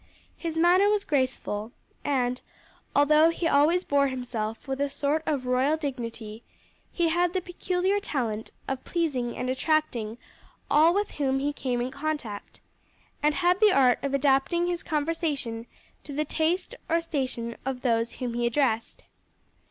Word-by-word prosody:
His 330 -2 -4
manner 360 +4 +5
was 415 -1 +1
graceful, 255 -5 -1 0.3
and 250 -3 0 0.5
although 300 +3 +6
he 335 0 -1
always 320 +5 +4
bore 280 -3 +2
himself 245 -3 -4
with 270 +1 -2
a 285 - +1
sort 290 +3 0
of 280 -4 0
royal 260 +5 +2
dignity 235 -6 -5 0.5
he 340 -2 +1
had 350 +1 +1
the 375 - +1
peculiar 365 +2 -1
talent 235 - -3 0.2
of 270 -1 -3
pleasing 275 -9 -1
and 250 - -2
attracting 255 -5 0 0.5
all 320 +4 +5
with 410 0 0
whom 270 -2 0
he 285 +2 -1
came 250 -4 -2
in 250 +1 -2
contact, 280 -7 -5 0.6
and 300 0 +2
had 360 +1 +2
the 430 -1 +6
art 255 -6 +4
of 275 0 0
adapting 275 +5 +2
his 350 -1 -2
conversation 295 -7 -2 0.4
to 285 - -8
the 305 +2 -1
taste 335 - 0 0.2
or 335 - +3
station 260 -8 -3
of 265 -1 -3
those 230 -2 +1
whom 245 -3 -4
he 240 0 0
addressed. 235 -3 0
280 Hz, 150 wpm, -27 LUFS, 250-330 Hz, 0.6 s, although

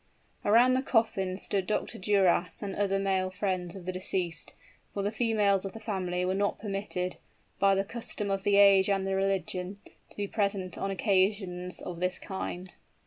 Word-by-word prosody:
Around 235 +5 +5
the 260 - +2
coffin 210 -7 +1
stood 195 -1 -1
Dr. 215 - -1
Duras 185 -2 +2
and 200 - -4
other 195 -1 +1
male 190 -1 +1
friends 185 -2 -2
of 185 -3 -9
the 185 - -1
deceased: 180 -3 -3 0.4
for 200 - -1
the 205 - 0
females 215 -4 +2
of 195 - -5
the 225 - -8
family 185 -4 -2
were 185 - +1
not 200 +1 0
permitted, 195 -3 -3 0.4
by 195 0 +5
the 195 - +1
custom 210 -1 -4
of 195 0 0
the 200 +1 +2
age 200 -1 +7
and 195 -1 +1
the 195 - -1
religion, 195 -1 -1 0.3
to - - -15
be 205 -1 -2
present 200 -4 -1
on 195 - -3
occasions 190 -2 0
of 175 -2 -6
this 180 +1 0
kind. 185 -2 -6
195 Hz, 180 wpm, -29 LUFS, 185-205 Hz, 0.4 s, age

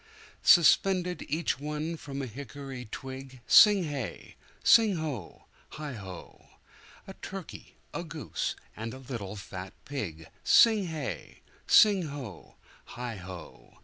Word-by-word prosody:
Suspended 180 +1 +5
each 155 -2 -1
one 150 +3 -3
from 140 -3 -6
a - - -2
hickory 135 +1 -8
twig 130 +3 -8
Sing 205 -4 +7
hey! 135 - -5 0.3
sing 220 -4 +6
ho! 145 - -5 0.3
heigho!A 120 - -11
turkey, 195 -2 -8 0.2
a - - -3
goose, 160 -2 -4 0.2
and 115 +2 -5
a - - -8
little 120 -7 -6
fat 95 -2 -8
pig 85 - -5 0.2
Sing 220 -5 +6
hey! 155 -4 -6 0.2
sing 200 -6 +6
ho! 135 - -9 0.4
heigho! 95 - -8
140 Hz, 110 wpm, -29 LUFS, 110-165 Hz, 0.4 s, Sing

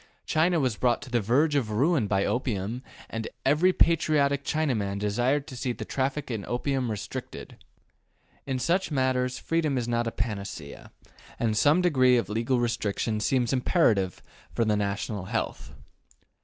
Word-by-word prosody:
China 165 +2 +2
was 130 -7 0
brought 120 -1 +2
to 130 - -11
the 120 -2 +2
verge 140 +9 +2
of 135 -7 +1
ruin 130 +2 +2
by 100 -1 +1
opium, 120 -2 -2 0.3
and 115 0 -4 0.2
every 155 +7 +4
patriotic 150 -5 +2
Chinaman 120 -12 -1
desired 120 +8 0
to 130 - -9
see 125 0 -2
the - - -7
traffic 135 +1 -2
in 110 -3 -3
opium 130 0 -1
restricted. 105 -3 -6 0.9
In 135 -1 -1
such 170 +9 +1
matters 130 -3 0
freedom 155 -4 0
is 120 -2 -2
not 120 0 0
a - - -1
panacea, 100 - -5 0.5
and 110 -2 0
some 150 +10 +4
degree 130 -7 +4
of 120 - -1
legal 115 +4 0
restriction 110 -2 -1
seems 125 +2 +1
imperative 115 - +2 0.3
for 115 - +2
the 105 -1 +2
national 100 -1 -2
health. 115 +3 -3
125 Hz, 155 wpm, -27 LUFS, 110-140 Hz, 0.9 s, every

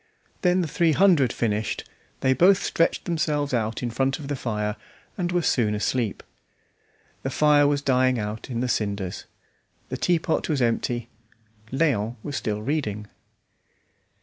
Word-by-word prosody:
Then 180 -1 +3
the 170 - -1
three 165 +1 +2
hundred 165 -9 +4
finished, 110 -2 -2 0.3
they 130 - +3
both 190 +7 +4
stretched 165 - +1
themselves 150 -4 -1
out 115 0 -1
in 120 - -2
front 135 +3 0
of 145 -2 -8
the 145 - -1
fire, 105 -4 -2 0.4
and 175 -2 -2
were 175 -1 +1
soon 110 -8 +2
asleep. 110 0 -1 1.0
The 135 - -2
fire 145 +1 +4
was 145 0 0
dying 130 -1 +3
out 105 +3 -5
in 120 -2 -2
the 125 - 0
cinders; 100 -5 -2 0.6
the - - -3
teapot 170 -2 0
was 150 -3 +1
empty, 120 0 0 0.6
Léon 125 -6 +1
was 145 - -5
still 105 -3 -2
reading. 110 -7 -2
130 Hz, 150 wpm, -25 LUFS, 110-155 Hz, 1.0 s, hundred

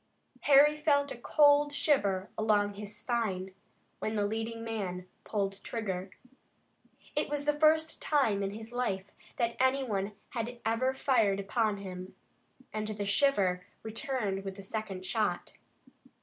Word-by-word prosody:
Harry 290 +1 +7
felt 290 -2 +2
a - - -4
cold 290 +3 +4
shiver 205 -11 +1
along 210 -2 +2
his 210 +1 -8
spine 210 -5 -2 0.5
when 215 - -2
the 205 -1 +1
leading 225 +2 -3
man 190 -5 -4 0.2
pulled 195 -2 -2
trigger. 195 -5 -3 1.1
It - - 0
was 290 -1 -2
the 295 - +3
first 315 +1 +3
time 245 -10 +2
in 195 - 0
his 220 +3 -8
life 200 -6 -2 0.3
that 235 -1 0
any 260 +1 +3
one 205 -4 -2 0.2
had 235 +1 -4
ever 250 +4 +1
fired 225 -8 +2
upon 210 +1 0
him, 185 -1 -8 0.6
and 215 0 -2
the 210 -1 -3
shiver 195 -5 +2 0.2
returned 220 -4 -2
with 195 -1 -5
the 195 - -9
second 195 -2 -5
shot. 210 -4 -1
220 Hz, 140 wpm, -31 LUFS, 195-260 Hz, 1.1 s, Harry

